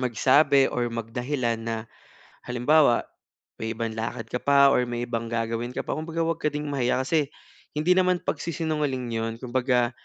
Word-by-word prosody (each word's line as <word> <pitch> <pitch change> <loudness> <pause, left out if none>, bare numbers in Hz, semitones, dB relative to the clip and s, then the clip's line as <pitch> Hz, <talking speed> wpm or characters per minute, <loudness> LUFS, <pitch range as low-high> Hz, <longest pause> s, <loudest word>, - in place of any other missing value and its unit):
magsabi 135 +3 +4
or 120 -1 -1
mag 115 -1 -4
dahilan 125 -3 -1
na 115 0 -3 0.7
halimbawa 125 +2 +3 0.6
may 110 0 -3
ibang 115 0 -3
lakad 115 +1 -4
ka 125 - -1
pa 140 -1 +6
or 125 - +2
may 120 0 -3
ibang 115 -1 -3
gagawin 115 +1 -2
ka - - -2
pa - - -1
kumbaga 165 +1 -2
huwag 165 -1 -1
ka - - 0
ding 150 0 -3
mahiya 130 -1 +1
kasi 150 +1 +1 0.5
hindi 155 +4 +1
naman 185 -1 +2
pagsisinungaling 150 -6 -2
'yon, 115 0 -2
kumbaga 125 -1 +1
125 Hz, 165 wpm, -25 LUFS, 115-150 Hz, 0.7 s, pa